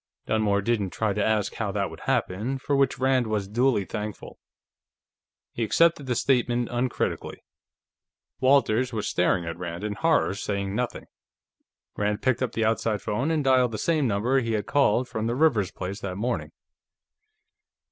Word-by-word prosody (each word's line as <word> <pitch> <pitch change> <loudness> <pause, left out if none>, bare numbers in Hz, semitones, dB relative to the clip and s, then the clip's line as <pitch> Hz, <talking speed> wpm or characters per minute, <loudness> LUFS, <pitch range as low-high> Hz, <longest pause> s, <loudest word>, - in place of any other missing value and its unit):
Dunmore 105 -2 +1
didn't 105 -3 0
try 110 +2 -1
to 105 +1 0
ask 110 -2 +1
how 105 -3 -2
that 100 -1 -1
would - - -10
happen, 110 +9 0
for 140 +2 -1
which 135 -1 +2
Rand 130 -2 +2
was 105 -3 -1
duly 120 -1 +1
thankful; 105 +1 -6 1.1
he 115 - -3
accepted 155 +4 +3
the 125 - 0
statement 120 -1 +1
uncritically. 120 0 -2 1.0
Walters 130 -2 +3
was 110 -3 -3
staring 90 0 +1
at 85 +1 -5
Rand 85 +1 -5
in 105 -1 -2
horror, 160 -2 +2
saying 100 -2 -3
nothing. 125 +2 -3 0.9
Rand 105 +1 -1
picked 130 -2 +1
up 125 -3 -1
the 115 - 0
outside 110 -1 0
phone 125 +9 -1
and 160 -2 +1
dialed 130 -3 +3
the - - -2
same 155 +1 +1
number 115 +6 +1
he 115 -3 -2
had 105 -2 -1
called 130 -3 +2
from 110 -2 -3
the 120 - -1
Rivers 125 - +3
place 95 +2 -6
that 100 -4 -5
morning. 120 +3 -2
115 Hz, 165 wpm, -26 LUFS, 105-130 Hz, 1.1 s, accepted